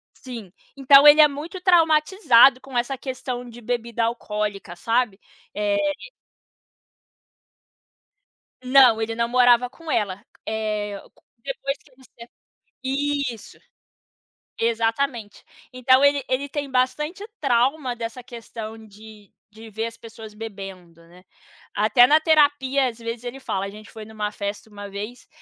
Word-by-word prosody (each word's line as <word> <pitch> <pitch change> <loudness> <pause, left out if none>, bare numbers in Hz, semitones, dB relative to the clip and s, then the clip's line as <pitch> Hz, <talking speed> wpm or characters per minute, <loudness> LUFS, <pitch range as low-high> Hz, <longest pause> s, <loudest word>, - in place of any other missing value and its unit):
Sim, 230 -8 -10 0.2
então 275 +1 +7
ele 300 +1 +9
é 300 - +8
muito 305 +6 -8
traumatizado 320 - +5
com 265 -1 -7
essa 250 +3 -1
questão 255 -2 -6
de 240 +1 -12
bebida 235 0 -2
alcoólica, 210 -5 -4
sabe? 225 +1 -1 0.3
Eh 205 -1 0 2.9
Não, 255 -3 +5
ele 225 +1 -3
não 235 0 0
morava 245 0 +4
com 320 +5 -13
ela. 200 -2 -1 0.2
Eh, 210 -2 -3 0.4
depois 285 - -4
que 280 - -26
você 245 -2 -16 0.5
isso. 275 -3 -3 1.0
Exatamente. 230 0 -1 0.3
Então 255 +2 +3
ele 285 0 +3
ele 275 +2 -1
tem 285 -1 -5
bastante 300 +9 -1 0.2
trauma 260 0 +1
dessa 230 +2 -6
questão 225 -2 -9
de 210 0 -16 0.2
de 220 +1 -13
ver 220 +2 -3
as 230 0 -8
pessoas 220 -2 -12
bebendo, 195 -6 -9
né. 180 +2 -19 0.5
Até 215 +4 +5
na 305 +1 +5
terapia 290 -4 +3
às 235 -1 -8
vezes 230 0 -6
ele 245 +2 -6
fala, 195 -5 -3
gente 210 +1 -13
foi 220 -1 -10
numa 210 -1 -5
festa 205 +1 -6
uma 205 -1 -9
vez, 210 +5 -8
240 Hz, 125 wpm, -23 LUFS, 215-270 Hz, 2.9 s, ele